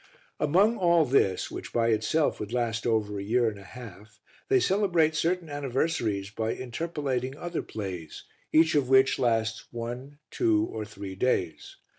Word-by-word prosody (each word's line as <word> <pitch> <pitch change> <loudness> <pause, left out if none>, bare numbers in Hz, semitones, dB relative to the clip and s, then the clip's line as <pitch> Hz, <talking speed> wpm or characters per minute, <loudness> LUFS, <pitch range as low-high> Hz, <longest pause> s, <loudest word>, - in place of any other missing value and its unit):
Among 195 +10 +3
all 170 -3 +4
this, 110 -8 +1
which - - -7
by 115 -1 +1
itself 110 +8 +1
would 105 0 -5
last 120 -2 -1
over 105 -3 0
a - - -4
year 120 +3 +2
and 105 -2 -3
a - - -12
half, 105 -2 -12 0.3
they 395 -1 +5
celebrate 180 - +2
certain 170 +2 0
anniversaries 130 -8 -1
by 110 +1 -2
interpolating 130 -1 -3
other 175 0 -3
plays, 90 -7 -7 0.3
each 160 0 +5
of 140 -4 +1
which 135 0 +5
lasts 115 -2 0
one, 120 +4 -6
two, 330 -3 +2
or 110 - -4
three 100 -2 -8
days. 95 -6 -1
125 Hz, 155 wpm, -27 LUFS, 110-160 Hz, 0.3 s, they